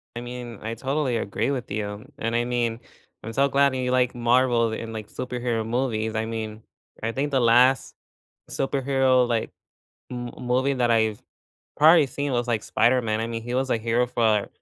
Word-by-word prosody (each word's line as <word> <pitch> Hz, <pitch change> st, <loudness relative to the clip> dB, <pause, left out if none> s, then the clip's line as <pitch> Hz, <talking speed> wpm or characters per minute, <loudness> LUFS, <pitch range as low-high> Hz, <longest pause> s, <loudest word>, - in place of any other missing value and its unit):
I 120 Hz, -, -4 dB
mean, 120 Hz, -2 st, -7 dB
I 115 Hz, +1 st, -4 dB
totally 135 Hz, 0 st, -1 dB
agree 105 Hz, +5 st, -1 dB
with 125 Hz, -3 st, -4 dB
you, 105 Hz, +2 st, -4 dB
and 115 Hz, -4 st, -2 dB
I 120 Hz, -, 0 dB
mean, 120 Hz, -2 st, -1 dB, 0.4 s
I'm 115 Hz, -, -6 dB
so 140 Hz, +3 st, +2 dB
glad 140 Hz, 0 st, +3 dB
that -, -, -2 dB
you 125 Hz, -1 st, -1 dB
like 125 Hz, -1 st, +2 dB
Marvel 120 Hz, -1 st, +2 dB
and, 115 Hz, 0 st, -5 dB
like, 110 Hz, -1 st, -7 dB
superhero 120 Hz, -3 st, -3 dB
movies. 115 Hz, -2 st, -1 dB
I 110 Hz, 0 st, 0 dB
mean, 110 Hz, -1 st, -5 dB, 0.4 s
I 115 Hz, -, 0 dB
think 140 Hz, +4 st, -2 dB
the 135 Hz, -, +2 dB
last 125 Hz, +3 st, +4 dB, 0.6 s
superhero, 135 Hz, -2 st, +2 dB
like, 115 Hz, -2 st, -1 dB, 0.6 s
m 120 Hz, -1 st, -5 dB
movie 130 Hz, +2 st, +1 dB
that 120 Hz, -2 st, +1 dB
I've 110 Hz, -2 st, +1 dB, 0.5 s
probably 155 Hz, -1 st, +6 dB
seen 140 Hz, +2 st, -3 dB
was, 120 Hz, 0 st, 0 dB
like, 115 Hz, -3 st, 0 dB
Spider-Man. 115 Hz, -2 st, +1 dB
I 115 Hz, -, -1 dB
mean, 115 Hz, -1 st, -4 dB
he 120 Hz, +2 st, -5 dB
was 130 Hz, +1 st, 0 dB
a -, -, +2 dB
hero 115 Hz, +2 st, +1 dB
for 110 Hz, -4 st, +1 dB
120 Hz, 185 wpm, -24 LUFS, 115-130 Hz, 0.6 s, probably